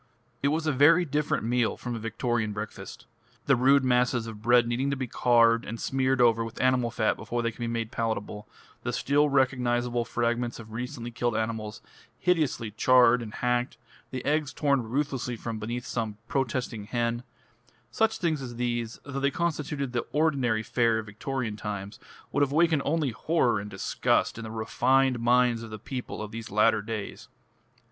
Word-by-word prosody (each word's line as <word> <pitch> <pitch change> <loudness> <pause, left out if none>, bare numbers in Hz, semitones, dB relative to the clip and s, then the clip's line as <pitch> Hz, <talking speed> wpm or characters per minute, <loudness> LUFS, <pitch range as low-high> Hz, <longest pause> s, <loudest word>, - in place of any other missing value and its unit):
It 140 - +2
was 155 +3 0
a 155 - +2
very 155 +6 +5
different 150 0 -1
meal 120 +1 +1
from 120 -1 -5
a - - -4
Victorian 115 0 -1
breakfast. 105 +2 -7 0.4
The 135 - +4
rude 135 +2 +4
masses 125 -2 +2
of 110 -2 -8
bread 120 +1 +4
needing 125 +4 0
to 140 - 0
be 130 - -2
carved 115 -1 +3
and 115 +2 -6
smeared 130 +1 0
over 115 -2 +4
with 115 0 -8
animal 130 -2 +2
fat 115 -2 +1
before 120 0 -3
they 115 - 0
could - - -20
be 120 - -2
made 115 -1 -3
palatable, 110 -2 -3 0.3
the - - -3
still 145 +2 +2
recognisable 125 -3 +1
fragments 120 +1 -1
of 110 -2 -11
recently 120 +1 -5
killed 120 -1 -1
animals, 110 -1 -3 0.3
hideously 155 -11 0
charred 125 +2 +5
and 110 -2 -7
hacked, 125 +2 -1 0.3
the 130 -1 -5
eggs 150 0 0
torn 140 -3 +2
ruthlessly 125 +1 -2
from 115 -1 -5
beneath 120 +3 -4
some 110 -4 -3
protesting 125 -4 -2
hen, 120 +1 -1 0.7
such 225 0 +1
things 160 -5 0
as 125 -2 -7
these, 120 -1 -2
though 140 -1 -5
they 140 +1 +2
constituted 150 -4 -2
the 120 - -2
ordinary 135 -8 +1
fare 115 0 +2
of 110 - -4
Victorian 115 +2 -4
times, 100 -1 -6 0.3
would 145 - 0
have 140 -1 +2
awakened 160 -1 +3
only 150 -2 +1
horror 125 -3 +1
and 105 +1 -7
disgust 95 +3 0
in - - -6
the 110 - -6
refined 125 +3 +2
minds 120 0 +3
of 115 - -8
the 110 - -6
people 125 -1 -6
of 105 - -7
these 115 -1 -7
latter 105 +1 +3
days. 105 -1 -6
120 Hz, 180 wpm, -27 LUFS, 115-135 Hz, 0.7 s, very